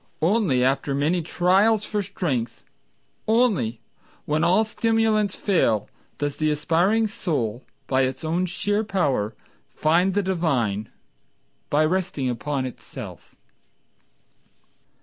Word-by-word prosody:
Only 170 - +3
after 135 +1 +1
many 155 +6 +1
trials 195 +6 +2
for 210 -1 -1
strength, 155 - -3 0.6
Only 215 - +2 0.4
when 155 +2 0
all 185 +6 +4
stimulants 220 -2 +1
fail, 115 - +1 0.3
Does 145 -1 -2
the 155 -1 +1
aspiring 170 +9 +2
soul 135 - -2 0.2
By 130 0 +1
its 130 +4 -4
own 175 +3 0
sheer 205 +4 -1
power 140 - 0 0.3
Find 175 +5 +2
the 205 - +2
divine 130 - 0 0.8
By 150 +2 +3
resting 175 -5 -1
upon 130 +3 -2
itself. 130 - -9
165 Hz, 110 wpm, -24 LUFS, 135-200 Hz, 0.8 s, all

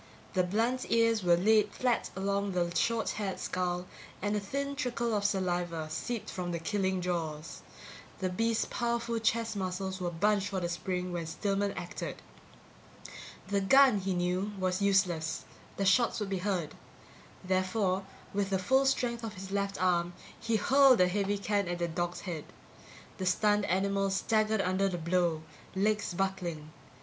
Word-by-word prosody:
The 185 - +3
blunt 230 +7 0
ears 230 -1 +3
were 175 -1 +5
laid 215 +4 +4
flat 245 -2 0
along 200 +1 -1
the 175 -1 0
short 230 +3 +1
haired 195 -2 -3
skull 180 -1 -2 0.3
and 205 +2 -1
a - - +1
thin 280 +8 -3
trickle 240 -3 -1
of 205 -1 0
saliva 175 -5 -1
seeped 220 +9 -3
from 180 -1 -4
the 170 - -1
killing 190 +2 -1
jaws. 165 -3 -3 0.6
The 185 - -1
beast's 225 +4 +1
powerful 235 -1 -1
chest 225 0 0
muscles 190 0 -3
were 175 - 0
bunched 200 +4 +1
for 195 -2 -2
the 175 -1 -2
spring 180 +1 -3
when 170 -2 -3
Stillman 200 +4 -1
acted. - - -6 1.3
The 200 -1 +1
gun, 260 +2 +6
he 190 -1 -1
knew, 180 +3 -1
was 185 0 -1
useless; 175 -5 +1 0.3
the 195 - 0
shots 230 +6 +3
would 205 -2 -3
be 195 -1 -1
heard. 180 -5 -1 0.7
Therefore, 185 +1 +1 0.3
with 200 -1 0
the 195 - +2
full 265 +9 +3
strength 235 -3 0
of 220 -2 -5
his 190 +1 -8
left 200 0 -1
arm, 175 -1 +2 0.3
he 230 0 0
hurled 265 +3 +5
a 180 - +6
heavy 200 +2 0
can 200 -1 0
at 175 0 -2
the 170 0 -1
dog's 175 +1 -3
head. 165 -6 -5 0.7
The 185 - -1
stunned 210 +2 +3
animal 195 +2 +1
staggered 215 +2 +1
under 190 +1 +1
the 180 - -3
blow, 170 -1 0 0.3
legs 210 -1 +1
buckling. 175 -5 -2
195 Hz, 160 wpm, -31 LUFS, 180-215 Hz, 1.3 s, gun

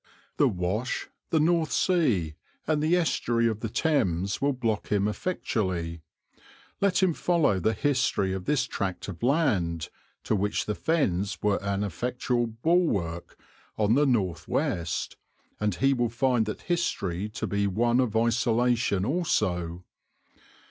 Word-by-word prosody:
The - - +5
Wash, 95 +7 -2 0.2
the 160 - +2
North 165 0 +2
Sea, 120 - +2 0.3
and 155 -1 +1
the 160 +3 +3
Estuary 120 -8 +1
of 110 -2 0
the 115 - -3
Thames 100 - 0
will 140 +1 +3
block 115 -5 -2
him 100 0 +1
effectually. 95 - -2 0.8
Let 195 -1 +2
him 180 -3 +3
follow 160 - +2
the 110 +5 +1
history 120 -7 +1
of 95 -1 -5
this 150 -3 +2
tract 95 -4 -4
of 85 -3 -8
land, 105 - +1 0.3
to - - 0
which 105 +1 0
the 105 - -1
fens 105 - 0
were 105 -1 +2
an 100 0 -1
effectual 120 +5 -1
bulwark 115 - 0 0.4
on 110 0 +3
the 145 +3 +4
north 95 -10 0
west, 85 -2 -2 0.4
and 105 -3 0
he 135 +8 +3
will 120 -2 0
find 120 -1 +1
that 105 - -4
history 105 - -1
to 105 - -4
be 100 0 0
one 120 +5 +2
of 115 -4 +1
isolation 115 -3 +2
also. 90 - -1
110 Hz, 140 wpm, -27 LUFS, 95-135 Hz, 0.8 s, The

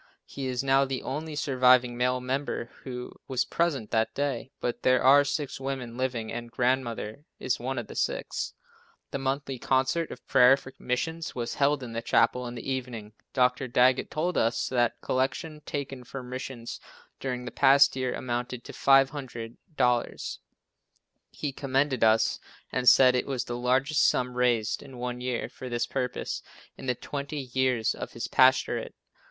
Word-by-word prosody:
He 135 -1 -5
is 125 0 -1
now 135 0 +4
the 135 -1 -3
only 150 +3 -4
surviving 125 -3 +4
male 125 +1 +1
member 130 -2 -3
who 125 -2 -7
was 130 -2 0
present 145 -10 -1
that 110 0 +1
day, 140 -3 -2
but 120 - -3
there 130 -1 +3
are 140 +2 +7
six 140 -1 -3
women 130 -3 -4
living, 125 -3 -2
and 120 0 -5
Grandmother 120 0 -1
is 130 - -1
one 130 +2 -3
of 120 - -3
the - - -10
six. - - -2 0.6
The 140 - -2
Monthly 135 -1 -2
Concert 130 +7 +1
of 125 - -10
Prayer 125 +2 +6
for 130 -1 -12
Missions 160 +7 -2
was 120 -1 -3
held 140 -1 +2
in 120 -2 -7
the 115 - -2
chapel 120 +2 +2
in 120 - -6
the 120 - -7
evening. 120 -5 -4 0.2
Dr. 130 0 +2
Daggett 125 +1 +3
told 175 +4 0
us 115 +1 +1
that 120 -2 +1
the - - -20
collection 150 +4 -1
taken 135 -3 -4
for 130 +2 -7
missions 125 -1 -6 0.4
during 125 -2 -3
the 120 - -5
past 140 0 +5
year 130 -1 -1
amounted 120 0 -3
to - - -10
$500. 135 -1 +1 0.9
He 145 - -4
commended 135 -1 0
us 110 0 +4 0.3
and 125 -1 +5
said 130 -1 +7
it 125 - 0
was 135 -3 -1
the 120 - -5
largest 130 +4 +2
sum 125 0 +1
raised 120 -3 +1
in 135 -3 -11
one 125 0 -4
year 125 -1 -2
for 130 - -9
this 120 0 0
purpose 125 0 -3 0.3
in 135 - -9
the 125 - +1
twenty 140 0 -5
years 130 -4 +2
of - - -7
his 115 - -4
pastorate. 130 0 +3
130 Hz, 170 wpm, -28 LUFS, 120-135 Hz, 0.9 s, are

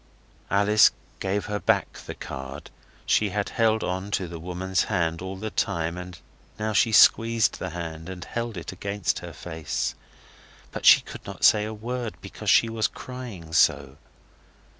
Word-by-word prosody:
Alice 100 +2 +5 0.3
gave 100 +2 -1
her 105 -1 -3
back - - +1
the - - -6
card. 65 +2 -8 0.3
She 105 - +2
had 100 +1 -2
held 110 -2 +2
on 95 +2 -3
to 95 - -5
the 85 -1 -8
woman's 90 +2 -1
hand 85 -1 -1
all 95 +1 -5
the 110 +3 -5
time, 85 -3 -1
and 90 0 -8 0.4
now 110 0 -2
she 110 +2 +3
squeezed 115 0 +5
the 95 - -3
hand, 80 0 -6
and 90 -1 -7
held 115 -3 -4
it 85 - -6
against 100 0 -2
her - - -8
face. 80 -3 -4 0.8
But - - -2
she - - +9
could - - -10
not - - -8
say 105 -1 +6
a 110 - -4
word 120 +1 -4
because - - -6
she 115 - +6
was 115 -1 0
crying 115 -11 -9
so. 70 -4 +3
95 Hz, 165 wpm, -25 LUFS, 85-110 Hz, 0.8 s, she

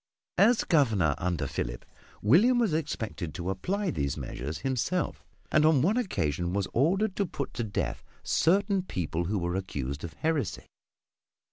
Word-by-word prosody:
As 225 +4 +5
Governor 110 - +3
under 85 -5 -1
Philip, - - -4 0.4
William 195 - +5
was 225 -8 +2
expected 110 - -3
to 90 +2 -2
apply 190 - -1
these 70 - -2
measures 70 +2 -5
himself, 130 - -1 0.3
and 155 - +4
on 155 -4 +5
one 200 +7 +3
occasion 90 - -1
was 100 -1 0
ordered 190 - +2
to 200 - +2
put - - -5
to 120 - -2
death 105 -2 -3 0.2
certain 195 +3 +2
people 85 - -3
who 105 +4 -1
were 85 -1 -1
accused 70 -7 -4
of 85 -2 -6
heresy. 155 - -1
110 Hz, 150 wpm, -29 LUFS, -, 0.4 s, As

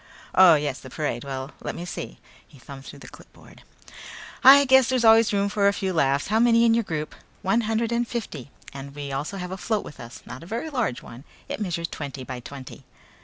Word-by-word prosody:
"Oh, 185 -3 +7
yes, 145 -3 -2
the 130 - -12
parade. 125 -4 -3
Well, 135 0 -6
let - - -5
me 175 - -6
see," 60 - -7 0.3
he - - -18
thumbed 135 +1 -12
through 145 - -10
the 130 -3 -13
clipboard, - - -16 0.8
"I 280 +2 +9
guess 265 -1 +5
there's 255 -3 +1
always 225 0 +6
room 200 -1 +1
for 200 0 +1
a 200 - +3
few 190 -2 -2
laughs. 140 -2 +1
How 220 +2 +2
many 235 0 +4
in 230 - +4
your 230 0 +2
group?" 155 -5 -4 0.3
"One 210 +5 +2
hundred 225 +1 0
and 235 0 0
fifty. 165 - -6 0.2
And 140 +1 -9
we 145 -1 -6
also 145 +9 -4
have 180 -1 -6
a 190 - -5
float 215 +2 -2
with - - -11
us. 120 +1 -11
Not 125 +4 -9
a 165 - -12
very 235 - -4
large 240 - -2
one. 120 +3 -12 0.2
It - - -5
measures 170 -4 -2
twenty 140 -4 -7
by 130 0 -7
twenty." 130 +1 -10
170 Hz, 220 wpm, -24 LUFS, 140-225 Hz, 0.8 s, I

